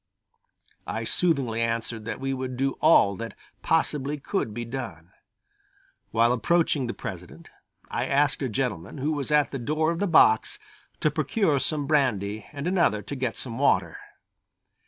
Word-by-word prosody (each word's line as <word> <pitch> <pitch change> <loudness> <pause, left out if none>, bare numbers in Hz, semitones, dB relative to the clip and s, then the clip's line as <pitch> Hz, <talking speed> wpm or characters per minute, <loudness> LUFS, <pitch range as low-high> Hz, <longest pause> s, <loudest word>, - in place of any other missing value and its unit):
I - - -3
soothingly 135 -10 +1
answered 115 -1 -2
that - - -4
we 135 0 -2
would 130 -1 -4
do 135 +1 +1
all 100 -11 +5
that 115 0 -6 0.3
possibly 150 -3 0
could 140 - -2
be 120 +2 -5
done. 110 -9 -7 1.0
While 115 +1 +3
approaching 150 0 +1
the 120 - -4
President, - - -8 0.4
I - - -2
asked 140 +1 +2
a 135 - -1
gentleman, 105 - -3
who 145 +3 -1
was 145 -3 -3
at 150 -1 +3
the 135 - -4
door 155 +6 0
of 170 - -3
the 205 - +1
box, 110 -10 +4 0.4
to 155 - +2
procure 155 - +1
some 150 +1 0
brandy 110 -8 0
and 145 0 -6
another 170 - +2
to 140 - -6
get 130 -3 -2
some 120 -1 -5
water. 90 - +2
135 Hz, 155 wpm, -26 LUFS, 115-150 Hz, 1.0 s, all